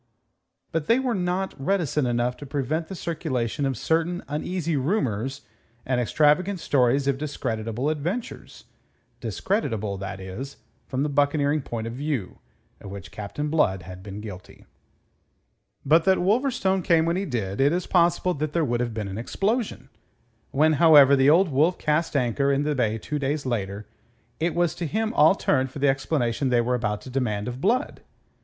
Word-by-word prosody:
But 160 -2 -2
they 230 - +5
were 260 -2 0
not 185 0 -1
reticent 150 -6 +1
enough 120 +1 0
to 145 - -9
prevent 145 +4 -2
the 190 - -7
circulation 140 -7 -2
of 130 -3 -2
certain 165 +5 0
uneasy 165 +2 -2
rumours 135 - -1 0.4
and 125 -1 +1
extravagant 155 - +2
stories 135 -1 +2
of 135 -1 +1
discreditable 115 -4 -3
adventures 165 +10 -4 0.6
discreditable, 110 - -2
that 100 0 -6
is, 95 +9 -7 0.3
from 130 +1 -1
the 150 - 0
buccaneering 145 +1 +1
point 115 -3 -5
of 115 - -5
view 135 -7 -3 0.4
of 100 - -10
which 100 -2 -9
Captain 110 +9 -4
Blood 95 - +1
had 90 +2 -10
been 100 +1 -8
guilty. 100 -4 -10 1.2
But 160 +4 +5
that 190 -1 +4
Wolverstone 195 -2 +1
came 165 -1 +3
when 170 +1 +1
he 195 +2 -1
did, 110 - -2
it 140 +2 +4
is 175 +2 -1
possible 175 0 +2
that 150 0 -3
there 170 -2 +2
would 120 -2 -1
have 120 -2 -2
been 105 -3 -3
an 100 +2 -5
explosion. 200 - -2 0.6
When, 155 +3 +3
however, 145 -4 +8
the 135 +1 +4
Old 175 +4 +5
Wolf 155 +6 +2
cast 155 +1 0
anchor 140 +1 +1
in 140 +1 +1
the 150 0 0
bay 115 -5 0
two 150 +6 -4
days 140 +1 -2
later, 105 -4 -3 0.5
it 165 0 0
was 175 -2 +2
to 170 - -4
him 220 +6 -1
all 155 +6 +5
turned 130 -7 +1
for 130 - -10
the 140 0 +3
explanation 135 -1 0
they 120 -1 +3
were 120 +1 +1
about 105 -4 -1
to 130 - -10
demand 110 -5 -1
of 125 +1 -5
Blood. 245 - 0
140 Hz, 175 wpm, -25 LUFS, 120-165 Hz, 1.2 s, however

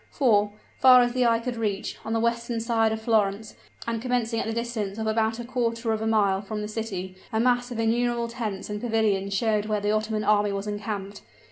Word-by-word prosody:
For, 210 -7 +2 0.3
far 255 -1 +8
as 240 0 -1
the 250 -1 +2
eye 230 0 +4
could 240 +1 -4
reach, 210 -3 -2
on 220 - -3
the 225 - +1
western 235 0 -1
side 225 -1 +1
of 220 - -2
Florence, 215 -1 +1 0.3
and 230 -1 -2
commencing 240 -2 0
at - - -2
the - - -1
distance 225 -3 -3
of 220 - -3
about 220 0 +1
a 240 - -5
quarter 230 -2 -1
of 220 - -2
a 220 - -1
mile 200 -3 +2
from 210 +1 -5
the - - -3
city, 200 -4 -5 0.2
a 220 - 0
mass 245 +1 +2
of 240 - -6
innumerable 235 +1 +1
tents 225 -5 -4
and 210 0 -5
pavilions 210 -4 0
showed 215 0 +1
where 215 -1 0
the 205 +1 0
Ottoman 215 0 -1
army 210 -1 +3
was 200 0 -3
encamped! 205 -1 -5
220 Hz, 220 wpm, -26 LUFS, 210-235 Hz, 0.3 s, far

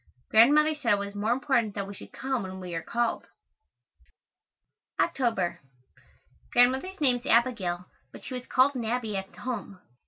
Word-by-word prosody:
Grandmother 295 +8 +6
said 255 -7 +1
it - - +2
was 200 0 -5
more 205 +2 -1
important 245 -5 +1
that 200 -1 -2
we 200 - -7
should - - -11
come 265 -1 -2
when 190 -1 -7
we 180 -2 -7
are 165 - -2
called. 235 +4 -2 1.7
October. 225 -9 0 0.9
Grandmother's 265 +10 +3
name 260 -5 +3
is 245 - -13
Abigail, 200 -7 +1 0.3
but - - -12
she - - -7
was 250 - -4
always - - -29
called 260 +2 +4
"Nabby" 230 -3 -2
at 195 0 -5
home. 210 -6 -5
235 Hz, 160 wpm, -27 LUFS, 200-255 Hz, 1.7 s, Grandmother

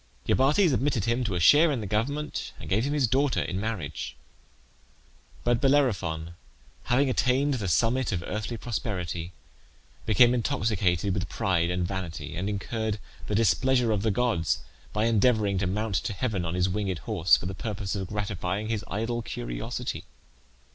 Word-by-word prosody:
Iobates 150 +5 +4
admitted 125 -5 +1
him 120 +2 +1
to 100 -4 -1
a - - 0
share 150 - +6
in 135 - -1
the 105 - -5
government, 140 +10 -2
and - - -9
gave 110 +6 +1
him 145 - -1
his 145 -3 +3
daughter 135 +4 +2
in 90 - -3
marriage. 95 -9 -4 1.3
But 120 -1 +2
Bellerophon 100 - +1 0.5
having 130 +3 +3
attained 135 +2 +2
the 110 -7 -2
summit 115 +8 +2
of 85 -3 -2
earthly 110 +2 -3
prosperity 90 -8 -3 0.8
became 120 +3 +6
intoxicated 105 - +1
with 95 -1 -2
pride 85 -3 +1
and 90 0 -1
vanity, 90 -4 -5
and 95 +4 -2
incurred 110 +1 -2 0.3
the 105 - -1
displeasure 120 +2 +3
of 105 -2 +1
the 110 - +1
gods 100 -6 0 0.3
by 105 +1 0
endeavouring 110 -3 +3
to 95 - 0
mount 105 +3 -2
to - - -1
heaven 100 -4 -2
on 85 +1 -2
his 90 0 +2
winged 95 -1 -1
horse, 95 -6 +4
for - - -7
the 95 - -3
purpose 100 0 -4
of 95 -3 -3
gratifying 105 0 -3
his 110 -3 -1
idle 115 +3 -2
curiosity. - - -4
105 Hz, 160 wpm, -27 LUFS, 95-125 Hz, 1.3 s, share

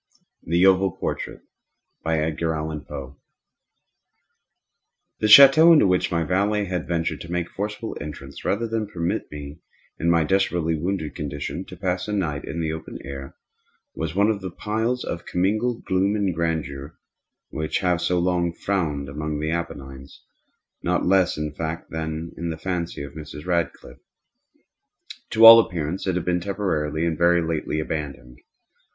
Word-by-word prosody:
THE 85 +3 +2
OVAL 95 -1 +4
PORTRAIT - - -4 0.6
The 75 -3 -2 2.1
château 140 +8 +9
into 155 - +6
which 90 -1 +1
my 85 -1 +1
valet 100 +5 +1
had 90 -3 -3
ventured 85 -1 -1
to 85 - -8
make 90 -1 -1
forcible 105 +3 -4
entrance, 70 -2 -8
rather 115 +4 0
than 110 -1 -2
permit 85 -4 -3
me, 75 +1 -8 0.4
in 85 - +1
my 85 -1 +4
desperately 85 -1 +1
wounded 80 0 -2
condition, 75 +2 -5
to 90 - -11
pass 90 +1 -2
a 105 - -3
night 80 -8 -2
in 85 - -4
the 80 -1 -1
open 80 - -7
air, 70 0 -8 0.6
was 80 +1 -4
one 100 +3 +4
of 100 -2 -4
those 95 -2 -7
piles 110 +4 -1
of 85 - -5
commingled 110 +6 0
gloom 95 +2 +1
and 100 -4 0
grandeur 80 -3 -3 0.5
which 80 0 -2
have 90 -3 +1
so 90 - +1
long 85 -1 +1
frowned 80 -8 -2
among 75 +1 -4
the 80 +1 -1
Appennines, 70 -5 -6 0.6
not - - 0
less 95 -2 +3
in 75 -1 -3
fact 80 +2 -5
than 80 +1 -4
in 85 +1 -4
the 80 - -4
fancy 85 -3 -3
of 70 0 -9
Mrs. 75 -1 -9
Radcliffe. 85 -2 -2 1.3
To 115 0 +5
all 115 0 +13
appearance 90 -3 -2
it 95 - +1
had 90 - -2
been 90 0 +1
temporarily 85 -6 -1
and 85 -1 0
very 85 0 +3
lately 80 -1 -2
abandoned. 70 -6 -5
85 Hz, 150 wpm, -23 LUFS, 75-95 Hz, 2.1 s, all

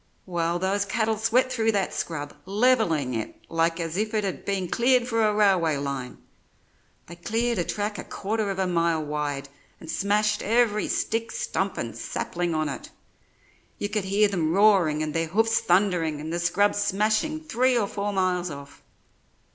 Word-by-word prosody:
Well, 170 -1 -1
those 190 +3 0
cattle 220 +2 0
swept 230 +4 +2
through 225 -1 +1
that 195 -2 0
scrub, 145 -3 -4
levelling 200 - +2
it 110 -2 -4
like 165 +1 +1
as 165 +1 -3
if 215 +1 -1
it 210 - +1
had 195 -2 -4
been 195 -2 -1
cleared 245 +4 +2
for 230 -2 +1
a 215 - +3
railway 190 -7 +3
line. 140 -3 -4 0.9
They 175 - -10
cleared 225 +5 -1
a - - +2
track 210 +3 -3
a - - -5
quarter 215 +1 -2
of 195 - -3
a 190 - +1
mile 170 -3 +1
wide, 145 -2 -3 0.3
and 160 - -7
smashed 210 +1 +1
every 225 -1 +2
stick, 225 +1 -1
stump - - -2
and - - -4
sapling 175 -1 -3
on 155 0 0
it. 135 -4 -6 0.9
You 205 - -3
could 210 -3 -2
hear 205 +2 +3
them 170 -5 0
roaring 190 -7 +4
and 155 -1 -3
their 165 0 0
hoofs 225 +6 +2
thundering 175 -5 +1
and 155 +2 -5
the 170 - -1
scrub 200 +4 +2
smashing 215 +9 0
three 255 -3 +2
or 220 - +2
four 200 +1 -3
miles 185 -2 0
off. 140 -1 -10
195 Hz, 175 wpm, -25 LUFS, 165-215 Hz, 0.9 s, roaring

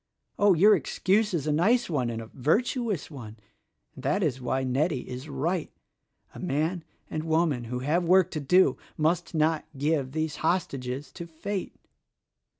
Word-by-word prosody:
Oh! 205 -2 +5
your 205 +6 +6
excuse 200 +6 +1
is 165 -6 -1
a 155 - +1
nice 220 +11 +3
one, 135 -8 -1
and 115 -1 -4
a 110 - -14
virtuous 210 - 0
one; 115 -6 -9 0.6
and 130 - -12
that 150 +9 +1
is 135 -5 -1
why 130 +2 -1
Nettie 135 +2 0
is 130 +4 -7
right. 155 +5 -1 0.6
A - - -10
man 165 +1 -1 0.3
and 155 - -2
woman 160 -6 +1
who 125 +2 -4
have 155 +7 +1
work 185 +1 +4
to 155 - -3
do 180 +7 +4 0.2
must 165 +2 0
not 155 0 +2
give 140 -2 0
these 155 -1 -2
hostages 145 -6 -2
to 170 -2 -8
Fate. 185 +4 -5
155 Hz, 160 wpm, -27 LUFS, 135-180 Hz, 0.6 s, your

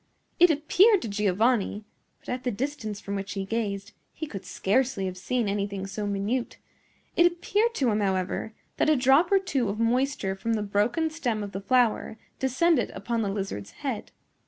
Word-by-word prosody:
It 355 +1 +8
appeared 360 +7 +4
to - - -3
Giovanni,—but, 210 +1 -1
at 250 +1 -3
the 250 - 0
distance 235 -3 -3
from 200 - -6
which 195 0 -4
he 195 -1 -3
gazed, 200 -1 -3 0.2
he 315 - -5
could 200 -10 -7
scarcely 200 +3 0
have 185 -1 -3
seen 225 +5 -1
anything 200 -1 -2
so 205 +1 -4
minute,—it 225 - -2
appeared 415 +6 0
to 255 -5 +2
him, 210 - +1
however, 190 +2 -1 0.2
that - - +3
a 310 - +5
drop 270 +8 +4
or 395 - +6
two 280 - 0
of 205 +2 -3
moisture 235 -3 +1
from 225 +4 -2
the 215 -2 0
broken 215 +11 +1
stem 245 -10 -2
of 200 - -6
the 195 - -5
flower 240 -1 +2 0.2
descended 265 0 +2
upon 230 +2 -2
the 205 - -1
lizard's 195 - -4 0.2
head. - - -3
225 Hz, 175 wpm, -27 LUFS, 200-265 Hz, 0.2 s, It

